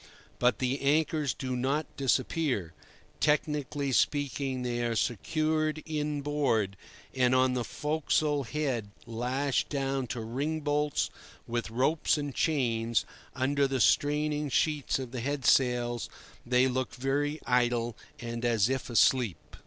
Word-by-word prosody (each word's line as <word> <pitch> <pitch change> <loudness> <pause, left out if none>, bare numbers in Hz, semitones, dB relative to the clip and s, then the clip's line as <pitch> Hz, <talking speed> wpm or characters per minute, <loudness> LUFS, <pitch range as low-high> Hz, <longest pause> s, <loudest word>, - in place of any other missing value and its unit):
But 125 -2 +3
the 130 +1 -1
anchors 150 0 +1
do 130 -1 -3
not 135 +5 0
disappear. 130 - 0 0.5
Technically 150 -2 0
speaking, 135 -1 0
they 120 -1 -1
are 115 -1 0
"secured 155 - 0
in 150 -2 -2
board"; 130 -9 +1 0.4
and, 130 -1 +3
on 130 0 +3
the 125 -1 -1
forecastle 150 0 0
head, 130 -6 -2 0.2
lashed 125 +4 -1
down 135 -2 -1
to 120 - -4
ring 140 +8 -2
bolts 145 0 0 0.3
with 120 -1 -3
ropes 135 +8 +1
and 145 -2 -3
chains, 115 -7 +1 0.3
under 140 +1 +2
the 135 -1 -1
straining 150 +2 +2
sheets 150 +1 +1
of 130 -3 -6
the 125 -2 -4
head 140 +1 -2
sails, 120 -2 +2 0.4
they 125 +1 +4
look 130 0 -2
very 145 +4 -1
idle 120 -2 +1 0.2
and 115 0 -5
as 115 -2 +3
if 130 -1 -2
asleep. 110 - +2
135 Hz, 130 wpm, -29 LUFS, 120-145 Hz, 0.5 s, they